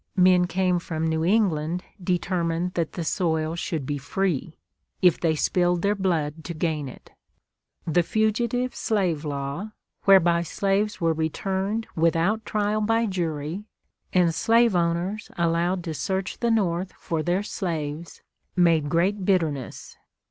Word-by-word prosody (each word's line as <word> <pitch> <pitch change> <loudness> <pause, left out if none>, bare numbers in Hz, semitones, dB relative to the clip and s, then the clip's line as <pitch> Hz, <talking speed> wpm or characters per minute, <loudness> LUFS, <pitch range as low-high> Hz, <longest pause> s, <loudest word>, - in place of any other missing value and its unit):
Men 180 -1 +5
came 180 -1 +1
from 160 -2 -3
New 160 0 0
England 175 -4 +1 0.2
determined 175 -1 -1
that 165 -2 -2
the 170 - -3
soil 160 -1 0
should 165 -5 -3
be 145 +1 -2
free, 165 +1 -2 0.4
if 180 -3 +4
they 160 -2 +1
spilled 175 +2 +1
their 200 +1 +3
blood 165 -6 -1
to 170 - -5
gain 155 -4 -1
it. - - -14 0.7
The 170 +1 +3
Fugitive 235 +6 0
Slave 180 -8 0
Law, 145 +8 -4 0.3
whereby 175 -3 +5
slaves 200 +4 0
were 165 -2 +2
returned 190 +7 -2
without 170 +7 +1
trial 210 0 0
by 225 +2 +2
jury, 170 -1 -3 0.5
and 175 -3 +3
slave 230 +3 +3
owners 175 +5 -1
allowed 170 +2 +1
to 165 -2 -4
search 190 +4 -3
the 235 - +1
North 185 -4 0
for 165 -2 -2
their 175 +5 0
slaves, 165 -5 -4 0.3
made 165 -4 +3
great 190 +6 +1
bitterness. 160 -9 -1
175 Hz, 135 wpm, -25 LUFS, 160-195 Hz, 0.7 s, Men